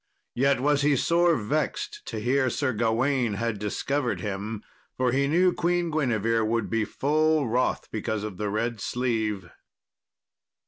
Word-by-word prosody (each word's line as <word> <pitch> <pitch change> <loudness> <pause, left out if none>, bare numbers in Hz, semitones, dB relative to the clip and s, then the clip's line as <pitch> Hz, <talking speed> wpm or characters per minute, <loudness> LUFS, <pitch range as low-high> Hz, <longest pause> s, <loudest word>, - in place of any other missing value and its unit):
Yet 135 +1 +2
was 145 +2 +2
he 145 0 +3
sore 170 +4 +3
vexed 135 +6 -2
to 115 - -4
hear 130 +4 +1
Sir 130 +1 -1
Gawain 115 +1 +1
had 115 0 -2
discovered 125 +6 -1
him, 105 +1 -4 0.3
for 130 -1 +2
he 140 +2 +2
knew 175 +4 +3
Queen 175 -1 0
Guinevere 115 -7 +1
would 115 +1 -1
be 115 -1 +1
full 155 +2 +1
wroth 125 +3 0
because 110 -1 -2
of 105 -4 -6
the 105 +1 -2
red 115 +2 -2
sleeve. 110 -7 -2
120 Hz, 145 wpm, -26 LUFS, 110-145 Hz, 0.3 s, he